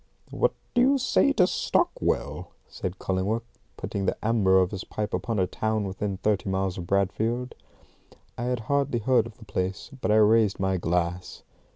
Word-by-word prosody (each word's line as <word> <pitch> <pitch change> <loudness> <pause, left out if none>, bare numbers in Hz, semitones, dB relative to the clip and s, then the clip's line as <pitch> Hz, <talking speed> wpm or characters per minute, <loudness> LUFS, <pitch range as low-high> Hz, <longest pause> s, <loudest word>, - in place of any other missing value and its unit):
"What - - +1 0.2
do 245 - +3
you 275 +2 +4
say 270 +2 +3
to 180 - +4
Stockwell?" - - -1
said 95 +1 -5
Cullingworth, 100 +6 -1 0.3
putting 100 -1 -3
the - - 0
amber 105 -4 +4
of 95 -1 +3
his 95 -3 -5
pipe 105 0 -4
upon 115 -3 -1
a 95 - +3
town 110 +3 -1
within 95 0 -3
thirty 105 0 0
miles 95 -1 -1
of 85 - -6
Bradfield. 110 +6 0 0.8
I 120 - -4
had 125 -2 -1
hardly 140 +1 0
heard 115 0 +2
of 115 - -14
the 115 - -14
place, 95 +5 -3
but - - -1
I 105 - +4
raised 110 -1 +4
my 95 0 +1
glass. 90 +1 -2
105 Hz, 175 wpm, -26 LUFS, 95-115 Hz, 0.8 s, you